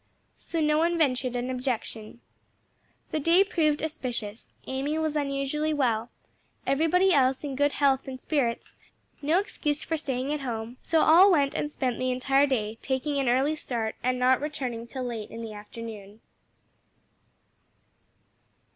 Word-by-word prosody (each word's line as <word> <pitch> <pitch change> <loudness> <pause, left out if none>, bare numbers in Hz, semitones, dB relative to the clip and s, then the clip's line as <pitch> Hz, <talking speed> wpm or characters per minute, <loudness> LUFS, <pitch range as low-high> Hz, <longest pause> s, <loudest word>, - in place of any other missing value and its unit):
So 330 - -3
no 305 0 +3
one 340 +1 +2
ventured 255 -5 +1
an 245 +1 -2
objection. 240 -3 -4 0.9
The 310 - 0
day 335 +6 +5
proved 310 -7 +1
auspicious. 245 -9 -5 0.2
Amy 275 +4 -2
was 315 -1 -1
unusually 290 +2 -1
well, 235 -4 0 0.6
everybody 325 +7 +3
else 265 -1 +3
in 280 -2 -4
good 285 +1 +2
health 275 -1 +2
and 260 -1 -6
spirits, 255 -5 -1 0.5
no 305 +4 +2
excuse 300 -6 -1
for 325 - -2
staying 270 -1 -2
at 300 - -2
home: 235 -1 -5
so 325 -1 +2
all 360 +6 +7
went 285 -5 +3
and 295 - -2
spent 255 -4 -2
the 255 - 0
entire 270 +3 +3
day, 225 -4 -2
taking 275 +2 -1
an 265 -3 +1
early 270 +5 +2
start 230 -7 -3
and 255 0 0
not 255 +1 +3
returning 255 -6 -4
till 260 +2 -5
late 230 -4 -5
in 230 - -7
the 220 -1 -6
afternoon. 210 0 -9
270 Hz, 150 wpm, -27 LUFS, 245-300 Hz, 0.9 s, all